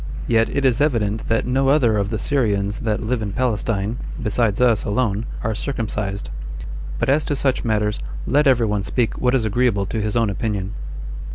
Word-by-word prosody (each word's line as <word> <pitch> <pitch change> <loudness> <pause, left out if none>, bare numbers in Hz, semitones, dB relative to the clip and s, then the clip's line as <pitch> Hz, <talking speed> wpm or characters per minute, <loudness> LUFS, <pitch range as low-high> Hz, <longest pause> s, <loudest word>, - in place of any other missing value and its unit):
Yet 115 -1 +3
it 140 - 0
is 130 0 +3
evident 110 -7 +1
that 115 0 +1
no 135 +2 +1
other 130 -6 +4
of 100 -1 0
the 110 - -1
Syrians 105 -5 0
that 110 0 -1
live 115 +1 -1
in 100 -2 -3
Palestine, 115 -3 0 0.2
besides 110 -2 +1
us 120 -4 +4
alone, 105 0 0 0.2
are 110 - 0
circumcised. 105 - -3 0.7
But - - 0
as 145 +3 +3
to 145 - 0
such 135 -1 +1
matters, 105 -2 0 0.3
let 145 +3 +3
every 125 -3 +4
one 105 -2 0
speak 115 +4 -1
what 125 +1 +3
is 120 -4 +1
agreeable 110 -2 +2
to 110 +2 -2
his 105 +1 -2
own 115 -3 +2
opinion. 100 -1 -2
115 Hz, 185 wpm, -21 LUFS, 105-125 Hz, 0.7 s, other